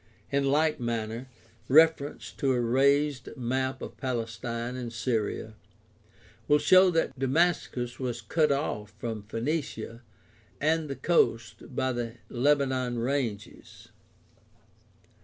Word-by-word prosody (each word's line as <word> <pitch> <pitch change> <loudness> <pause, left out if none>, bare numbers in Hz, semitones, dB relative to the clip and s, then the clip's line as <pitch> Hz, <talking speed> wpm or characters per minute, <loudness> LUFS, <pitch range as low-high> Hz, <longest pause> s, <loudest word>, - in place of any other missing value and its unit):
In 140 0 +1
like 155 +2 +2
manner, 115 +1 -3 0.4
reference 155 0 +3
to 135 -2 0
a 125 - +1
raised 135 +2 +2
map 130 +2 -2
of - - -8
Palestine 120 -1 -3
and 125 -2 -5
Syria 110 -2 -2 0.9
will 150 - +5
show 185 +6 +6
that 165 -6 0
Damascus 135 -4 0
was 125 -3 -3
cut 150 +7 +1
o& 140 -7 -1
from 115 -1 -4
Phoenicia 115 0 -4 0.6
and 155 0 +1
the 135 - -3
coast 125 -5 0
by 130 +1 +1
the 120 -1 -4
Lebanon 130 -2 +1
ranges. 120 -4 -4
130 Hz, 110 wpm, -28 LUFS, 115-145 Hz, 0.9 s, show